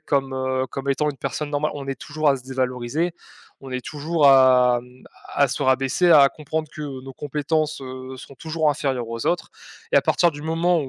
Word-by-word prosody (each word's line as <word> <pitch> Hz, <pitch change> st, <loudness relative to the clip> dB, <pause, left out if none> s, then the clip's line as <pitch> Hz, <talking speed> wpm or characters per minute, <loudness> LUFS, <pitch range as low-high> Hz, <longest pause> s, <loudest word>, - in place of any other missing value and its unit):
comme 135 Hz, -3 st, -1 dB
heu, 130 Hz, 0 st, -1 dB
comme 135 Hz, +1 st, -6 dB
étant 150 Hz, +2 st, +1 dB
une 140 Hz, -, -11 dB
personne 140 Hz, +2 st, -4 dB
normale. 150 Hz, +1 st, 0 dB
On 140 Hz, -1 st, -6 dB
est 135 Hz, -, -3 dB
toujours 155 Hz, 0 st, -1 dB
à 140 Hz, -, +4 dB
se 125 Hz, -, -11 dB
dévaloriser, 130 Hz, +5 st, -2 dB, 0.5 s
on 135 Hz, -1 st, -10 dB
est 125 Hz, -1 st, -4 dB
toujours 155 Hz, +1 st, 0 dB
à 125 Hz, -2 st, +6 dB
mmh, 125 Hz, +1 st, -18 dB, 0.3 s
à 140 Hz, -, +4 dB
se 140 Hz, +3 st, -3 dB
rabaisser, 135 Hz, +6 st, +2 dB
à 140 Hz, -3 st, +8 dB
comprendre 155 Hz, +1 st, -4 dB
que 150 Hz, -, -6 dB, 0.2 s
nos 135 Hz, 0 st, -9 dB
compétences, 150 Hz, +2 st, -2 dB
heu, 130 Hz, 0 st, -8 dB
seront 135 Hz, +1 st, -12 dB
toujours 160 Hz, +2 st, 0 dB
inférieures 130 Hz, -5 st, -2 dB
aux 115 Hz, 0 st, -4 dB
autres. 175 Hz, -, 0 dB, 0.4 s
Et, -, -, +5 dB
à -, -, +5 dB
partir 175 Hz, -1 st, +3 dB
du 145 Hz, 0 st, -10 dB
moment 165 Hz, +2 st, +1 dB
où, 135 Hz, -, -5 dB
140 Hz, 210 wpm, -23 LUFS, 130-155 Hz, 0.5 s, à